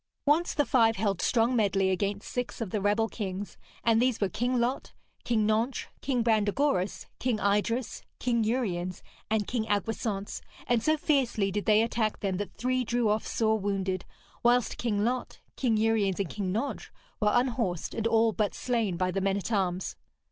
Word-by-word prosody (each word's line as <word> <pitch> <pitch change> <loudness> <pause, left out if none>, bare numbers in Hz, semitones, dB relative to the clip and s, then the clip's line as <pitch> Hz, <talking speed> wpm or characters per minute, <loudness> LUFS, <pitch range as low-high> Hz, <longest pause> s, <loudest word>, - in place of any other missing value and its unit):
Once 310 +4 +2
the 290 - +2
five 230 -2 +4
held 195 -3 0
strong 235 +1 +2
medley 195 -4 +2
against 200 +2 -2
six 245 -1 -4
of 220 -6 -4
the 210 - -1
rebel 210 +3 +2
kings, 200 -3 -5 0.3
and 230 -1 +4
these 250 -2 +2
were 200 - +1
King 245 +6 0
Lot, 245 +3 -1 0.3
King 220 -3 +1
Nentres, 225 +4 0
King 255 -4 0
Brandegoris, 215 -1 +1
King 245 -3 0
Idres, 210 +5 0 0.2
King 235 -2 +1
Uriens, 185 -7 -1 0.3
and 215 -1 +1
King 230 -1 -1
Agwisance; 205 0 -2 0.2
and 240 -2 +2
so 310 +5 +2
fiercely 255 -10 +1
did 205 +1 -3
they 215 0 +5
attack 225 -2 -1
them 195 -2 -1
that 205 +1 -5
three 255 +1 0
drew 235 -1 +1
off 210 +1 0
sore 220 -1 +1
wounded, 190 -2 -1 0.4
whilst 245 0 +2
King 210 -3 0
Lot, 250 +1 -2 0.2
King 235 -5 +1
Uriens 215 -4 +2
and 195 -4 -1
King 195 -3 -2
Nentres 225 +9 -3 0.3
were 210 - +3
unhorsed, 235 -8 0
and 225 0 0
all 225 0 +4
but 210 -1 -1
slain 230 -8 -1
by 185 +1 0
the 195 - -1
men 195 0 +1
at 200 +3 -4
arms. 185 -3 -1
220 Hz, 175 wpm, -29 LUFS, 200-240 Hz, 0.4 s, they